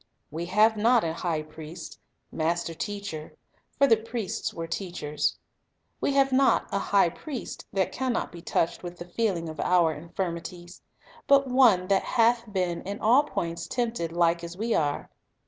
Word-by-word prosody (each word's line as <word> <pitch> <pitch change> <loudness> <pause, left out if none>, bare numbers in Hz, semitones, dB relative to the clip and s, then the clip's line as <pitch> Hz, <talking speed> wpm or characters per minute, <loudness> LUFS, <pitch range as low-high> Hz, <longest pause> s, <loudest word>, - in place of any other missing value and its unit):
"We 165 +3 -4
have 215 +4 +4
not 235 +3 +4
a 160 -1 -1
high 165 -2 -2
priest" 155 +2 -10 0.2
— - - -49
master 170 +1 -1
teacher, 200 -4 -6 0.4
for 280 - +6
the 225 -5 +5
priests 225 -2 -4
were 165 - -5
teachers 165 -4 -2 0.2
— - - -49
" - - -47
we 280 - +1
have 275 -1 +3
not 265 +1 +4
a 200 - 0
high 195 -4 +3
priest 265 - -7
that 190 -1 0
can 260 -1 -1
not 230 - -2
be 170 - -10
touched 170 0 0
with 175 -1 -7
the 175 - -8
feeling 180 -3 -1
of 155 -1 -8
our 175 -3 +3
infirmi 170 +2 -4
ties; 175 0 -10 0.5
but 275 0 +6
one 235 -8 +5
that 195 -1 +4
hath 235 -1 +2
been 180 -3 -1
in 200 +1 -5
all 250 +7 +5
points 170 - -3
tempted 230 -9 -2
like 170 0 +2
as 170 +1 -7
we 225 +2 0
are." 145 -2 -1
180 Hz, 180 wpm, -27 LUFS, 170-230 Hz, 0.5 s, for